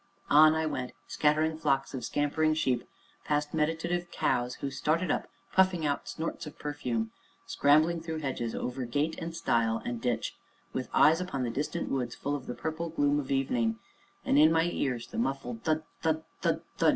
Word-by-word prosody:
On 155 Hz, +2 st, +8 dB
I 160 Hz, 0 st, 0 dB
went, 130 Hz, -5 st, -3 dB
scattering 155 Hz, +1 st, +2 dB
flocks 135 Hz, -3 st, +1 dB
of 130 Hz, -, -4 dB
scampering 155 Hz, +2 st, +1 dB
sheep, 130 Hz, -6 st, 0 dB, 0.4 s
past 150 Hz, 0 st, 0 dB
meditative 165 Hz, +3 st, 0 dB
cows 125 Hz, -5 st, 0 dB
who 140 Hz, -, -4 dB
started 160 Hz, +6 st, +1 dB
up, -, -, -1 dB, 0.3 s
puffing 185 Hz, -4 st, +3 dB
out 145 Hz, -1 st, -1 dB
snorts 165 Hz, -1 st, -4 dB
of 150 Hz, -, -10 dB
perfume; 125 Hz, -7 st, -2 dB, 0.3 s
scrambling 155 Hz, +4 st, +3 dB
through 160 Hz, -1 st, -4 dB
hedges, 130 Hz, -6 st, -3 dB
over 125 Hz, +1 st, -3 dB
gate 145 Hz, +7 st, 0 dB
and 165 Hz, 0 st, -5 dB
stile 115 Hz, -8 st, +1 dB
and 120 Hz, -1 st, -3 dB
ditch, 120 Hz, -2 st, -1 dB, 0.4 s
with 130 Hz, -, -3 dB
eyes 160 Hz, +4 st, +5 dB
upon 140 Hz, -8 st, -2 dB
the 120 Hz, -, -1 dB
distant 150 Hz, +6 st, -2 dB
woods 125 Hz, -3 st, -1 dB
full 145 Hz, +1 st, -2 dB
of 135 Hz, -3 st, -7 dB
the 125 Hz, -, -4 dB
purple 160 Hz, +1 st, -3 dB
gloom 145 Hz, -2 st, +2 dB
of 135 Hz, -, -5 dB
evening, 120 Hz, -5 st, +1 dB, 0.5 s
and, 140 Hz, -, +4 dB
in 155 Hz, +1 st, +7 dB
my 165 Hz, 0 st, +4 dB
ears, 125 Hz, -4 st, -1 dB
the -, -, -5 dB
muffled 125 Hz, -2 st, -2 dB
thud! 155 Hz, 0 st, +1 dB, 0.2 s
thud! 160 Hz, -1 st, +1 dB, 0.2 s
thud! -, -, +1 dB, 0.2 s
thud! -, -, +5 dB
145 Hz, 180 wpm, -30 LUFS, 125-160 Hz, 0.5 s, On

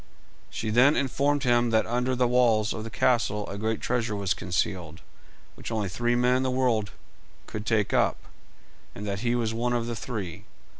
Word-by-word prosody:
She 110 Hz, -, -3 dB
then 125 Hz, +6 st, +5 dB
informed 140 Hz, +1 st, +1 dB
him 120 Hz, -1 st, +3 dB
that 110 Hz, -1 st, +2 dB
under 125 Hz, +2 st, 0 dB
the 125 Hz, 0 st, +2 dB
walls 115 Hz, -3 st, +3 dB
of 110 Hz, -, -5 dB
the 115 Hz, -, -6 dB
castle 105 Hz, -4 st, +1 dB
a -, -, -6 dB
great 110 Hz, +1 st, -1 dB
treasure 120 Hz, -3 st, -1 dB
was 100 Hz, -1 st, 0 dB
concealed, 90 Hz, -3 st, -3 dB, 0.5 s
which -, -, -8 dB
only 105 Hz, -4 st, -1 dB
three 120 Hz, +5 st, 0 dB
men 125 Hz, +1 st, +3 dB
in -, -, 0 dB
the 130 Hz, -, 0 dB
whole 130 Hz, -, -2 dB
world 115 Hz, -5 st, +1 dB, 0.5 s
could 105 Hz, 0 st, -7 dB
take 110 Hz, -3 st, +1 dB
up, -, -, +2 dB, 0.8 s
and 105 Hz, -, -6 dB
that 100 Hz, -1 st, -3 dB
he 120 Hz, +2 st, 0 dB
was 115 Hz, -2 st, -1 dB
one 120 Hz, +2 st, -1 dB
of 120 Hz, -1 st, 0 dB
the 120 Hz, 0 st, -4 dB
three. 105 Hz, -7 st, -6 dB
115 Hz, 195 wpm, -27 LUFS, 105-125 Hz, 0.8 s, then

